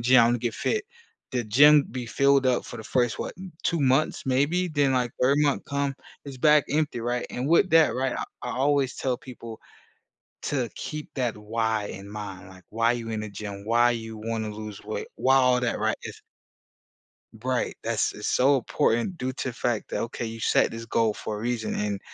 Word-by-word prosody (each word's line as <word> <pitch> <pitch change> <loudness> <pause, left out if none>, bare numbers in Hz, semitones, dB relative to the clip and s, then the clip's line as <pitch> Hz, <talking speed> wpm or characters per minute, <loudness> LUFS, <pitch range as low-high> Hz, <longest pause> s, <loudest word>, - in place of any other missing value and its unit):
gym, 125 +2 +6
I 115 - +6
wanna 120 +1 +2
get 120 -1 -2
fit." 425 -2 -1 0.5
The 125 -2 -1
gym 145 +7 +6
be 125 -2 -4
filled 140 +2 +3
up 125 -1 +2
for - - -8
the - - -7
first, 120 -1 0
what, - - -4 0.3
2 170 - +1
months 135 +2 +2
maybe? 145 +8 +2
Then, 145 -4 +1
like, 125 -2 0
3rd 135 +3 +4
month 145 -2 +1
come, 140 -1 -1 0.3
it's 135 -2 -8
back 150 +2 +5
empty, 150 -5 0
right, 120 +1 -1
and 125 - -3
with 175 +3 +4
that, 160 -1 +5
right, 130 0 -1
I - - -2 0.2
I 125 - -3
always 140 -1 +1
tell 130 -2 -1
people 115 -3 -10 0.8
to 130 -5 -1
keep 150 0 -6
that 125 -5 -1
why 110 0 -1
in 100 0 -8
mind, 100 -3 -7
like, 95 -1 -15
why 115 +2 +2
you 115 -2 -4
in 110 - -2
the 105 - -5
gym? 100 0 -7
Why 120 +2 +4
you 115 -1 -6
wanna 110 0 -3
lose 105 -1 -8
weight? 110 +1 -5
Why 135 +1 +3
all 125 -1 +4
that, 125 -2 -1
right, - - +1
if - - -8 1.2
Right, 130 -1 -1
that's - - 0
it's - - -6
so 135 +2 +4
important 120 +6 0
due 130 -3 -3
to 130 -1 -3
fact 120 -2 -2
that, - - -2
okay, 120 0 -4
you 115 0 -7
set - - +3
this 115 0 -6
goal 115 -1 +1
for 105 - -5
a - - -6
reason, 115 -1 -2
and 105 -1 -2
125 Hz, 205 wpm, -26 LUFS, 110-135 Hz, 1.2 s, gym